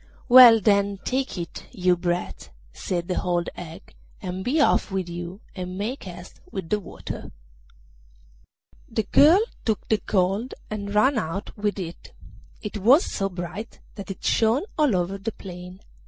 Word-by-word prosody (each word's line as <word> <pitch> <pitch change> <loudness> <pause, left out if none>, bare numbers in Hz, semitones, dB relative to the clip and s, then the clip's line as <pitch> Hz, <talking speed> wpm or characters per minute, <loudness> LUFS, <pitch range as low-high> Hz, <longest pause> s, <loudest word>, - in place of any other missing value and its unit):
'Well, 245 -3 +10
then, 200 -1 +2
take 260 -6 -1
it, 170 -1 -7
you 180 -5 +2
brat,' 175 0 -3 0.2
said 175 -2 -3
the 180 - -1
old 175 -1 0
hag, 165 - -10 0.3
'and 185 +1 -5
be 280 +9 +1
off 285 - +3
with 190 -2 -2
you, 175 +3 -7
and 180 -1 -5
make 225 +6 -4
haste 175 -1 -10
with 190 -5 -5
the 210 - +1
water.' 195 - -8 1.6
The 225 -1 -1
girl 320 - +6 0.2
took 220 -2 -1
the 215 -2 +2
gold 195 +5 0 0.2
and 200 -1 -4
ran 255 +4 +4
out 190 +2 -5
with 205 -1 -1
it, 175 -3 -7
and - - -18 0.3
it 210 0 -4
was 255 - +5
so 195 0 -1
bright 180 +4 -7
that 200 -1 -9
it 195 - -7
shone 230 +6 +2
all 295 - +3
over 185 +2 -1
the 220 +3 -4
plain. 180 0 -10
195 Hz, 160 wpm, -24 LUFS, 180-220 Hz, 1.6 s, Well